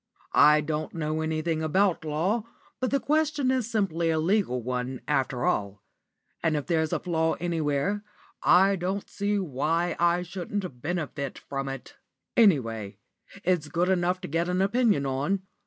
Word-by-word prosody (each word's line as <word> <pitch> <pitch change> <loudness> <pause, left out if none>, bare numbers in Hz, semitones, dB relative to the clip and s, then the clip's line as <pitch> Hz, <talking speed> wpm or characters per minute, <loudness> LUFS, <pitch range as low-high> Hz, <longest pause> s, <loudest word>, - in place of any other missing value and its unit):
I 150 0 +6
don't 155 +2 -3
know 155 -1 -1
anything 160 0 -1
about 180 +3 +2
law, 175 +9 0 0.3
but 255 0 0
the 275 - +1
question 300 -3 +1
is 255 -4 0
simply 170 -7 0
a 160 - +2
legal 160 - +1
one, 125 +1 -3
after 135 -4 0
all; 100 -1 -1 0.6
and 160 -2 +1
if 145 - -2
there's 160 -3 +1
a - - +1
flaw 160 -2 0
anywhere, 170 +3 -1 0.4
I 195 +2 +5
don't 190 +3 -3
see 205 +1 -1
why 165 +1 0
I 175 +1 +3
shouldn't 180 -5 -5
benefit 150 -4 -3
by 135 -1 -2
it. 130 - -14 0.4
Any 200 - +6
way, 110 -4 -6 0.5
it's 180 -5 +1
good 175 +4 0
enough 180 0 +1
to - - -5
get 165 +3 -1
an 180 +1 0
opinion 210 - +2
on. 145 +9 -1
165 Hz, 155 wpm, -27 LUFS, 145-195 Hz, 0.6 s, I